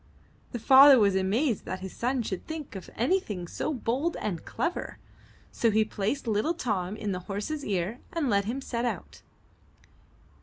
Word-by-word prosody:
The 240 Hz, -, -3 dB
father 270 Hz, +4 st, +8 dB
was 205 Hz, -4 st, +4 dB
amazed 210 Hz, +6 st, +1 dB
that 185 Hz, 0 st, -5 dB
his 190 Hz, -1 st, -7 dB
son 250 Hz, +1 st, 0 dB
should 190 Hz, -4 st, -5 dB
think 315 Hz, -7 st, -6 dB
of 190 Hz, -, -8 dB
anything 225 Hz, -, 0 dB
so 310 Hz, -, -3 dB
bold 270 Hz, +5 st, -1 dB
and 175 Hz, -6 st, -3 dB
clever, 345 Hz, +1 st, -3 dB, 0.5 s
so 230 Hz, -, +2 dB
he 215 Hz, 0 st, +3 dB
placed 210 Hz, +9 st, -2 dB
little 225 Hz, +10 st, +1 dB
Tom 205 Hz, -, -2 dB
in 210 Hz, -2 st, -3 dB
the 180 Hz, -, -2 dB
horse's 245 Hz, +10 st, -3 dB
ear 200 Hz, +3 st, -2 dB
and 330 Hz, -4 st, -1 dB
let 200 Hz, -4 st, +2 dB
him 250 Hz, +6 st, -3 dB
set 235 Hz, -3 st, -3 dB
out. 245 Hz, -, -4 dB
225 Hz, 165 wpm, -28 LUFS, 200-270 Hz, 0.5 s, father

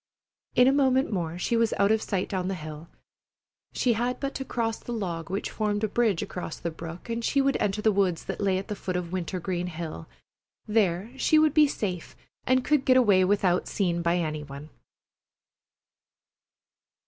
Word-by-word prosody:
In 250 Hz, -, +6 dB
a -, -, +6 dB
moment 265 Hz, -4 st, +2 dB
more 170 Hz, -3 st, -2 dB
she 205 Hz, +6 st, 0 dB
was 230 Hz, -1 st, +2 dB
out 200 Hz, +1 st, +3 dB
of 220 Hz, 0 st, +2 dB
sight 190 Hz, -2 st, -2 dB
down 185 Hz, -2 st, -2 dB
the 195 Hz, -, -1 dB
hill. 155 Hz, 0 st, -8 dB, 0.8 s
She 245 Hz, -, +1 dB
had 240 Hz, +3 st, -1 dB
but 275 Hz, 0 st, -3 dB
to 270 Hz, -, -4 dB
cross 230 Hz, -3 st, -2 dB
the -, -, -8 dB
log 175 Hz, -8 st, -3 dB
which 195 Hz, +2 st, -3 dB
formed 210 Hz, -1 st, -1 dB
a -, -, +3 dB
bridge 215 Hz, -4 st, +1 dB
across 180 Hz, -3 st, -6 dB
the 170 Hz, -, -4 dB
brook 165 Hz, +1 st, -9 dB
and 230 Hz, 0 st, -3 dB
she 280 Hz, -, +1 dB
would 275 Hz, 0 st, +2 dB
enter 210 Hz, +1 st, -1 dB
the 220 Hz, -, +5 dB
woods 190 Hz, -4 st, 0 dB
that -, -, -4 dB
lay 195 Hz, -2 st, +2 dB
at 190 Hz, -, -5 dB
the 210 Hz, -, -3 dB
foot 185 Hz, -2 st, -4 dB
of 175 Hz, -1 st, -3 dB
Wintergreen 180 Hz, 0 st, -3 dB
Hill. 160 Hz, -, -6 dB, 0.6 s
There 210 Hz, -1 st, +1 dB
she 310 Hz, -, +3 dB
would 310 Hz, -2 st, +4 dB
be 305 Hz, -1 st, +6 dB
safe 185 Hz, -, -4 dB, 0.3 s
and 255 Hz, 0 st, +3 dB
could 300 Hz, -3 st, +2 dB
get 255 Hz, -1 st, +5 dB
away 205 Hz, -7 st, +5 dB
without 185 Hz, -2 st, +2 dB
seen 175 Hz, -4 st, 0 dB
by 170 Hz, +1 st, +1 dB
any 155 Hz, -3 st, -2 dB
one. 140 Hz, +1 st, -10 dB
195 Hz, 190 wpm, -27 LUFS, 175-235 Hz, 0.8 s, In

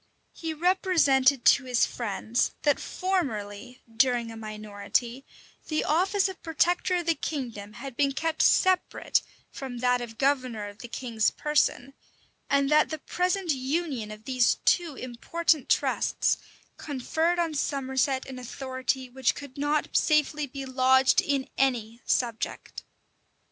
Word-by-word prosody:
He 325 Hz, -1 st, -5 dB
represented 300 Hz, -7 st, +3 dB
to 280 Hz, -, +5 dB
his 250 Hz, -2 st, +2 dB
friends, 230 Hz, 0 st, -2 dB
that 290 Hz, -2 st, +3 dB
formerly, 250 Hz, -, -3 dB
during 240 Hz, -2 st, +2 dB
a -, -, -9 dB
minority, 215 Hz, +3 st, -3 dB, 0.4 s
the 310 Hz, -1 st, 0 dB
office 380 Hz, +5 st, +2 dB
of 380 Hz, -1 st, -8 dB
protector 345 Hz, +3 st, +1 dB
of 350 Hz, -1 st, -1 dB
the 335 Hz, -, +3 dB
kingdom 235 Hz, -11 st, -5 dB
had 270 Hz, +3 st, -8 dB
been 280 Hz, +1 st, +2 dB
kept 325 Hz, +2 st, -1 dB
separate 370 Hz, -1 st, +3 dB, 0.3 s
from 260 Hz, -3 st, -7 dB
that 250 Hz, 0 st, +2 dB
of 225 Hz, -2 st, -8 dB
governor 255 Hz, -6 st, 0 dB
of 205 Hz, +2 st, -12 dB
the 240 Hz, -, -8 dB
king's 230 Hz, -3 st, 0 dB
person; 280 Hz, -3 st, 0 dB, 0.6 s
and 280 Hz, -1 st, +3 dB
that 305 Hz, 0 st, +5 dB
the 315 Hz, -, -3 dB
present 360 Hz, +3 st, -1 dB
union 270 Hz, -3 st, -2 dB
of 215 Hz, 0 st, -10 dB
these 255 Hz, -2 st, +3 dB
two 340 Hz, -5 st, +2 dB
important 275 Hz, +5 st, -1 dB
trusts -, -, +1 dB, 0.4 s
conferred 315 Hz, +5 st, -1 dB
on 335 Hz, -2 st, 0 dB
Somerset 265 Hz, -2 st, -1 dB
an 260 Hz, -1 st, -8 dB
authority 260 Hz, +1 st, -3 dB
which 255 Hz, 0 st, 0 dB
could 285 Hz, -3 st, -10 dB
not 290 Hz, +1 st, -1 dB
safely 300 Hz, -1 st, +2 dB
be 275 Hz, +1 st, -7 dB
lodged 260 Hz, 0 st, +4 dB
in 275 Hz, -2 st, -1 dB
any 240 Hz, -3 st, 0 dB
subject. 235 Hz, -3 st, -2 dB
265 Hz, 135 wpm, -27 LUFS, 245-310 Hz, 0.6 s, to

